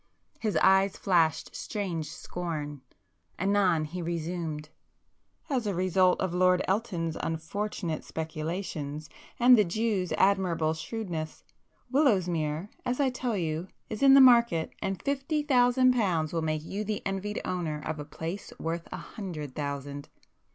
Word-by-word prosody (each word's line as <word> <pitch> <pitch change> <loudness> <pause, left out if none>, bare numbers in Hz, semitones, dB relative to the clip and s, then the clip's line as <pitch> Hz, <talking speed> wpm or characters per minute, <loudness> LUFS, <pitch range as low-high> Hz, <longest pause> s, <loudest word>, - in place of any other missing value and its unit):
His 215 -3 0
eyes 190 0 +4
flashed 165 -5 +1
strange 180 -8 -3
scorn. 150 -5 -5 0.6
Anon 190 -4 +2
he 175 +4 -5
resumed—"As 170 - -5
a 200 - -1
result 185 0 +3
of 185 -2 -1
Lord 180 0 +3
Elton's 185 -6 -1
unfortunate 165 +2 -3
speculations, 155 -2 -4 0.3
and 245 +1 +8
the 215 - +5
Jews' 200 -1 -1
admirable 180 -5 +2
shrewdness, 165 -3 -5 0.5
Willowsmere, 180 - +2
as 250 +2 -1
I 270 -2 +3
tell 245 -3 -2
you 165 0 -2 0.2
is 215 - -4
in 275 0 +8
the 275 - +9
market, 235 -10 +5
and 195 -1 -2
fifty 280 +2 -1
thousand 255 -2 +4
pounds 175 -10 0
will 165 - 0
make 155 -1 -1
you 205 +4 -3
the 215 0 -3
envied 195 +2 -2
owner 170 -5 -2
of 155 -1 -3
a - - -4
place 165 +6 -6
worth 165 +1 -3
a - - -4
hundred 170 -7 -7
thousand." 140 0 -5
180 Hz, 135 wpm, -29 LUFS, 160-210 Hz, 0.6 s, the